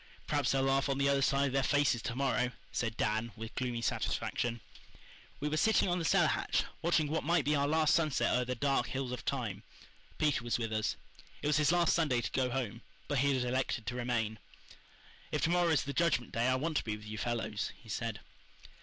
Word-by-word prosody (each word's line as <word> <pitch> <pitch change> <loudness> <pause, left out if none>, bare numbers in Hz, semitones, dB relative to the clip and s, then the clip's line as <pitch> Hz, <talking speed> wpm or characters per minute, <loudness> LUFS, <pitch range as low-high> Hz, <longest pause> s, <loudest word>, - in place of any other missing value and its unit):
"Perhaps - - 0
they'll 135 0 +2
laugh 135 +1 +2
on 135 - 0
the 140 0 +2
other 140 0 +3
side 140 +1 +3
of 135 - -2
their 135 - +3
faces 140 -3 +2
to 115 - -4
morrow," 125 -2 +1 0.2
said 115 -2 -2
Dan, 110 +2 0
with 110 0 -7
gloomy 120 -2 -2
satisfaction. 120 +1 -1 0.8
We 150 - -2
were 155 +1 -1
sitting 220 +4 +3
on 175 +1 +1
the 165 - -2
cellar - - +4
hatch, - - 0 0.2
watching 165 -2 +2
what 155 +2 -1
might 165 -1 +2
be 150 - +2
our 140 0 +2
last 155 0 +3
sunset 155 -4 +2
o'er 125 - +2
the 125 +1 -3
dark 135 +2 +1
hills 130 -1 -3
of 125 - -5
time. 115 -8 -2 0.6
Peter 145 -5 +1
was 120 - 0
with 115 -2 -3
us. 110 0 0 0.5
It - - -3
was 150 0 +3
his 150 0 +3
last 175 -1 +3
Sunday 150 -8 +2
to 120 - -3
go 130 -1 +1
home, 120 -3 -3 0.3
but 145 -3 0
he 140 +2 +3
had 125 -1 0
elected 125 -2 -1
to 125 - -3
remain. 120 -3 -1 0.9
"If - - -1
to 165 - +2
morrow 175 -1 +3
is 160 - +3
the 140 - -4
Judgment 160 -8 +1
Day 115 +2 +1
I 130 - +3
want 155 +4 -1
to - - 0
be 105 -2 -3
with 105 - -13
you 110 0 -6
fellows," 120 0 -2
he - - -19
said. - - -3
135 Hz, 225 wpm, -32 LUFS, 120-150 Hz, 0.9 s, cellar